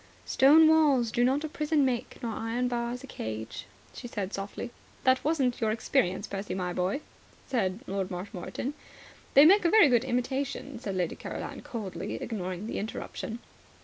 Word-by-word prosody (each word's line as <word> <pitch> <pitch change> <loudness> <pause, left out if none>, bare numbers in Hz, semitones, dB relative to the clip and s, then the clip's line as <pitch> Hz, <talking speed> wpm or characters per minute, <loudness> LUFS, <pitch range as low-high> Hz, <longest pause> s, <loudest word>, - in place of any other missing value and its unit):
"Stone 305 +4 +6
walls 290 -7 +4
do 240 +1 +2
not 270 +4 +2
a - - -1
prison 300 -1 +1
make 245 -3 -2
nor 230 - -1
iron 230 +3 -1
bars 240 +1 -2
a - - -6
cage," 110 - -6 0.3
she 245 - -7
said 205 -5 -4
softly. 200 +4 -5 0.3
"That 260 -1 +4
wasn't 275 -6 +1
your 220 - +2
experience, 220 -3 +1
Percy, 200 -1 -4
my 180 -1 -2
boy," 185 +11 -1 0.4
said 205 -5 -1
Lord 195 -3 -2
Marshmoreton. 190 +8 -5 0.6
"They 280 - +10
make 390 +5 +7
a 340 - +4
very 410 -7 +7
good 240 -1 +4
imitation," 265 +1 -2
said 200 -5 -4
Lady 180 -3 -1
Caroline - - -6
coldly, 215 -6 -5
ignoring 185 -3 -4
the - - -3
interruption. 220 +1 -5
240 Hz, 165 wpm, -29 LUFS, 195-270 Hz, 0.6 s, They